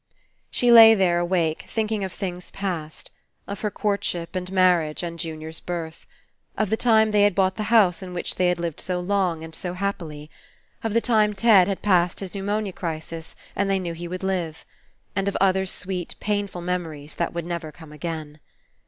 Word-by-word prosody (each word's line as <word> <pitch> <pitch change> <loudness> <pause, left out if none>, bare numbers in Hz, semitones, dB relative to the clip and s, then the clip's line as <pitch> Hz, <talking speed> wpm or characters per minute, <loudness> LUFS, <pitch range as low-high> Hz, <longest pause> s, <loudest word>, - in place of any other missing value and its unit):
She 245 -1 +2
lay 225 -1 +10
there 180 -4 +2
awake, 175 -3 0
thinking 220 -2 -1
of 190 - -3
things 180 -2 -5
past. 170 -6 -5 0.4
Of 200 0 -6
her 210 - 0
courtship 195 -4 -2
and 180 0 -3
marriage 180 -4 +3
and 170 -1 -5
Jun 160 -1 -4
ior's 160 +1 -6
birth. 165 -2 -6 0.5
Of 215 -2 0
the - - +4
time 220 -2 +4
they 210 -1 +4
had 205 -2 +4
bought 190 -1 +2
the - - -4
^ - - -4
house 205 -7 +4
in 185 -1 -7
which 175 -1 -2
they 180 - +1
had 180 0 +1
lived 170 -3 -3
so 180 -1 -2
long 180 -3 0
and 160 0 -9
so 180 +2 -4
happily. 165 -6 -4 0.5
Of 225 -1 -2
the 230 - +4
time 215 -3 +2
Ted 200 -3 +6
had 195 -2 -3
passed 180 -3 +3
his 195 -2 -5
pneu 200 - -4
monia 205 -1 -1
crisis 165 -1 -6 0.2
and 200 -1 0
they 195 - +2
knew 175 -3 -3
he 170 +1 -6
would 185 +2 -6
live. 175 -5 -2 0.5
And 195 0 0
of 200 - 0
other 190 0 +2
sweet 180 -1 -3
painful 205 -3 -2
memories 165 -5 -4
that 170 - -2
would 170 -1 -3
never 170 -2 -4
come 160 -1 -14
again. 155 -1 -6
180 Hz, 200 wpm, -24 LUFS, 170-200 Hz, 0.5 s, lay